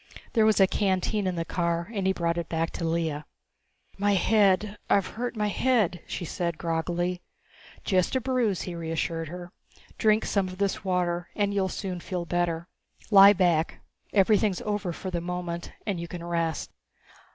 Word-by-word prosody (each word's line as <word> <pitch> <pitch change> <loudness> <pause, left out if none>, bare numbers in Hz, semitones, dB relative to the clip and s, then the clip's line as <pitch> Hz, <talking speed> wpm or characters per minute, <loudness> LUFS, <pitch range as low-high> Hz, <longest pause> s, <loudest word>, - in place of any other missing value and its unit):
There 220 -2 +4
was 215 - +3
a 195 - +8
canteen 190 +1 0
in 185 - -1
the 165 -1 -2
car 170 +2 -1
and 195 -3 -1
he - - +4
brought 170 -2 -1
it 170 - -5
back 165 0 -1
to - - -5
Lea. 165 -2 -1 0.8
"My 205 0 +3
head 205 +1 +3
I've 200 -2 +4
hurt 240 +2 -4
my 210 -1 0
head," 215 -7 +1
she 175 - -4
said 170 0 -2
groggily. 175 +2 -1 0.6
"Just 185 +3 +1
a - - +3
bruise," 245 -7 0
he 180 - -5
reassured 165 0 -2
her. 175 +2 -8 0.5
"Drink 215 0 +3
some 195 -2 +1
of 185 0 -8
this 200 -1 -1
water 175 -2 -1
and 205 -1 +1
you'll 195 -2 +1
soon 185 -1 -4
feel 180 0 -4
better. 170 -1 -1 0.4
Lie 200 0 +9
back. 175 -4 +1 0.3
Everything's 205 -1 +3
over 205 -3 -2
for 185 +2 -6
the 170 -1 -2
moment 175 -1 -4
and 200 -5 -2
you 170 - -5
can 170 0 -7
rest." 170 -2 -2
180 Hz, 175 wpm, -27 LUFS, 170-200 Hz, 0.8 s, Lie